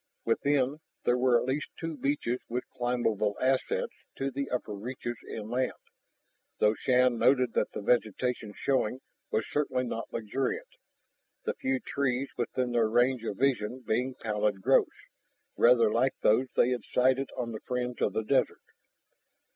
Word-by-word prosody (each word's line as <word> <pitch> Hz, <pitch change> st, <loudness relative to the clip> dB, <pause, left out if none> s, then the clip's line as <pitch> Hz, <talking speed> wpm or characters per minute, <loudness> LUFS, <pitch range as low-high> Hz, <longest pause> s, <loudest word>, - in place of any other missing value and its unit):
Within, 140 Hz, +4 st, +1 dB, 0.2 s
there 120 Hz, -, +3 dB
were 125 Hz, -1 st, +4 dB
at -, -, -3 dB
least 135 Hz, +3 st, -1 dB
two 165 Hz, -1 st, -4 dB
beaches 135 Hz, -4 st, -1 dB
with 125 Hz, +2 st, -3 dB
climbable 115 Hz, -4 st, 0 dB
ascents 300 Hz, -, 0 dB, 0.2 s
to 135 Hz, 0 st, -2 dB
the 140 Hz, +1 st, -3 dB
upper 125 Hz, -4 st, -3 dB
reaches 120 Hz, +3 st, -5 dB
inland. 120 Hz, +4 st, -2 dB, 0.8 s
Though 105 Hz, 0 st, +4 dB
Shann 125 Hz, 0 st, +2 dB
noted 125 Hz, -3 st, +3 dB
that -, -, +1 dB
the -, -, -5 dB
vegetation 115 Hz, -1 st, 0 dB
showing 130 Hz, -2 st, 0 dB, 0.3 s
was 110 Hz, -, 0 dB
certainly 130 Hz, -3 st, 0 dB
not 115 Hz, -2 st, -4 dB
luxuriant, 135 Hz, -, -2 dB, 0.7 s
the 465 Hz, -, -1 dB
few 265 Hz, -, -1 dB
trees 135 Hz, -, -1 dB
within 125 Hz, +1 st, -1 dB
their 115 Hz, -2 st, +2 dB
range 120 Hz, +1 st, +2 dB
of 100 Hz, -, -3 dB
vision 130 Hz, -2 st, 0 dB
being 125 Hz, +3 st, -1 dB
pallid 105 Hz, -2 st, -1 dB
growths, -, -, +4 dB, 0.7 s
rather 120 Hz, -2 st, +5 dB
like 130 Hz, +4 st, +2 dB
those 125 Hz, +5 st, +3 dB
they 125 Hz, -, +4 dB
had 125 Hz, -, -1 dB
sighted 130 Hz, +2 st, +2 dB
on 120 Hz, -2 st, -2 dB
the 110 Hz, -, -6 dB
fringe 125 Hz, -1 st, -2 dB
of -, -, +1 dB
the 110 Hz, -, -1 dB
desert. 105 Hz, -, +1 dB
125 Hz, 150 wpm, -29 LUFS, 115-130 Hz, 0.8 s, rather